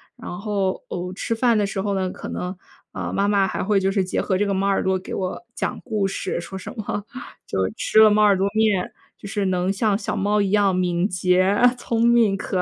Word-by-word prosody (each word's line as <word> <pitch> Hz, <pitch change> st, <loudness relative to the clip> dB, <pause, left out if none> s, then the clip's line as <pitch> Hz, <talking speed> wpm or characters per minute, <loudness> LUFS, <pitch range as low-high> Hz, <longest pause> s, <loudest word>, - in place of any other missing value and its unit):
然 175 Hz, -, -7 dB
后， 200 Hz, -2 st, -2 dB
哦， 180 Hz, 0 st, -4 dB
吃 230 Hz, -, -2 dB
饭 235 Hz, 0 st, +2 dB
的 205 Hz, -, +2 dB
时 195 Hz, -1 st, -3 dB
候 200 Hz, 0 st, -1 dB
呢， 190 Hz, -1 st, -1 dB
可 -, -, -8 dB
能， 180 Hz, +1 st, -4 dB, 0.4 s
啊， -, -, -4 dB
妈 200 Hz, -, +1 dB
妈 200 Hz, -2 st, +3 dB
还 -, -, -3 dB
会 200 Hz, +1 st, +2 dB
就 190 Hz, 0 st, +1 dB
是 195 Hz, -1 st, +1 dB
结 185 Hz, -, -2 dB
合 190 Hz, -, 0 dB
这 205 Hz, -, +1 dB
个 200 Hz, -, 0 dB
猫 195 Hz, +1 st, 0 dB
耳 195 Hz, -, +1 dB
朵 190 Hz, 0 st, +1 dB
给 185 Hz, -, -7 dB
我 185 Hz, -1 st, -3 dB
讲 -, -, -3 dB
故 215 Hz, -5 st, -1 dB
事。 190 Hz, -2 st, -3 dB
说 190 Hz, +3 st, -8 dB
什 -, -, -8 dB
么 205 Hz, -1 st, -4 dB, 0.4 s
就 -, -, -3 dB, 0.2 s
吃 220 Hz, -, +2 dB
了 220 Hz, 0 st, +8 dB
猫 210 Hz, 0 st, +3 dB
耳 205 Hz, -2 st, +5 dB
朵 190 Hz, -, +1 dB
面， 215 Hz, -4 st, +1 dB, 0.3 s
就 200 Hz, -, -9 dB
是 205 Hz, -1 st, -1 dB
能 185 Hz, 0 st, 0 dB
像 200 Hz, 0 st, +1 dB
小 -, -, -3 dB
猫 205 Hz, +1 st, +1 dB
一 200 Hz, -, 0 dB
样 200 Hz, -2 st, +3 dB
敏 180 Hz, 0 st, +1 dB
捷， 185 Hz, +1 st, +2 dB, 0.2 s
聪 230 Hz, -1 st, 0 dB
明 235 Hz, -4 st, +4 dB
可 195 Hz, 0 st, -3 dB
爱。 -, -, +2 dB
195 Hz, 255 characters per minute, -22 LUFS, 185-210 Hz, 0.4 s, 了